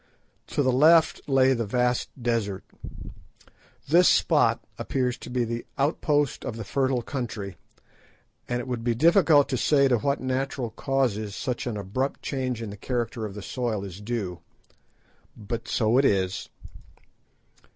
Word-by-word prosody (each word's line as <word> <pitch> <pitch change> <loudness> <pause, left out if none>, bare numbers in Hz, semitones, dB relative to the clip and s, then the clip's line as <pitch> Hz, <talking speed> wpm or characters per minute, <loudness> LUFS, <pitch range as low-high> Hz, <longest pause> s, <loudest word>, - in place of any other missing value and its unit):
To 145 - 0
the 130 - +3
left 155 +5 +5
lay 135 -1 +4
the 120 -2 -1
vast 125 +2 0
desert. 115 -5 -1 1.2
This 175 +4 +6
spot - - +3 0.2
appears 125 -2 -1
to - - -9
be 125 0 0
the 115 0 -3
outpost 145 0 +1
of 110 - -4
the 115 - -5
fertile 130 +2 0
country, 110 -8 -5 0.9
and 120 0 0
it 120 - -6
would 120 -2 -3
be 120 -1 +1
difficult 160 - +5
to 130 - 0
say 140 +2 +3
to 120 -3 +2
what 140 +4 0
natural 130 -2 -2
causes 110 -5 -1
such 125 0 -3
an 115 -3 -3
abrupt 105 +8 -3
change 130 -4 -2
in 105 - -6
the 105 - -9
character 115 -1 -3
of 100 - -10
the 105 - -7
soil 115 -5 -2
is 95 0 -8
due. 105 -6 -3 1.0
But 115 +2 -5
so 115 +2 +2
it 140 - +3
is. 95 -3 0
125 Hz, 150 wpm, -26 LUFS, 110-135 Hz, 1.2 s, This